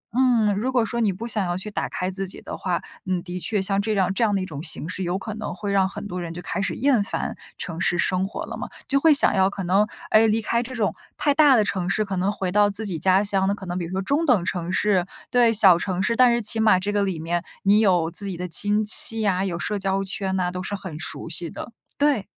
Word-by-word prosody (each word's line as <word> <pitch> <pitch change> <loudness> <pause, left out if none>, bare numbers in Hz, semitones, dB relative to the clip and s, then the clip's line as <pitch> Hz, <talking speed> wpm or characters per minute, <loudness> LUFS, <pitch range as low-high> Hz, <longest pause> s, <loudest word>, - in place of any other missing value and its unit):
嗯， 240 -5 +3
如 245 +6 -1
果 245 -3 +2
说 235 +1 -3
你 220 -4 +2
不 195 +6 -6
想 215 -4 0
要 175 +1 -2
去 210 +3 -5
打 - - -3
开 185 +1 -3
自 195 +1 -4
己 185 - -6
的 - - -7
话， - - -2 0.2
你 185 -2 -1
的 180 0 -6
确 210 +2 0
像 195 +1 0
这 215 +1 -1
样 190 -2 +1
这 230 - 0
样 205 -2 +2
的 195 - 0
一 - - -4
种 145 -5 -7
形 160 -1 -1
式 185 +1 -4
有 180 +1 -1
可 215 +2 -6
能 215 -4 -6
会 200 +1 -4
让 190 -1 +2
很 200 - -7
多 180 -2 -5
人 170 -1 -6
就 - - -6
开 195 - -3
始 190 -4 -2
厌 255 -5 +2
烦 - - -3 0.2
城 170 0 -5
市 175 - +1
生 185 +2 +1
活 200 - -6
了 - - -7
嘛。 - - -6 0.2
就 275 - +2
会 320 +3 +5
想 290 - +4
要 190 0 +3
可 195 -1 -6
能， 195 +4 +2 0.2
哎， 220 +1 +5
离 220 +1 +1
开 235 +2 0
这 250 +2 -7
种 205 -7 0 0.2
太 290 -2 +2
大 290 -2 +5
的 220 - +4
城 190 -3 -2
市， 215 - +1
可 195 -1 -4
能 190 +3 0
回 185 -3 -3
到 205 +1 +3
自 205 +2 -2
己 175 -5 -3
家 190 +3 +3
乡 195 -2 +1
的 200 - 0
可 195 - -10
能 175 - -4
比 170 - -3
如 165 - -8
说 190 +1 -2
中 285 - 0
等 210 -10 +3
城 175 -1 -3
市 190 -3 +1 0.2
对， 240 -2 +4
小 190 -5 +6
城 185 0 -2
市。 230 +4 +1
但 250 -1 +5
是 235 - +1
起 220 +2 +3
码 215 -4 +4
这 200 +2 -3
个 205 -1 0
里 190 -4 -1
面， 170 +2 -2 0.2
你 205 +2 +4
有 180 -6 +2
自 200 +4 0
己 185 -3 -5
的 180 - -4
亲 205 +5 +2
戚 220 +1 +5
啊， 190 -1 +1
有 175 -3 -3
社 205 +3 -2
交 195 0 0
圈 195 -1 -2
啊， 180 -1 -1
都 180 - -5
是 205 +2 -4
很 185 -6 -8
熟 - - -5
悉 170 -2 -3
的。 235 - -8 0.3
对。 285 -8 +1
195 Hz, 305 characters per minute, -23 LUFS, 185-215 Hz, 0.3 s, 小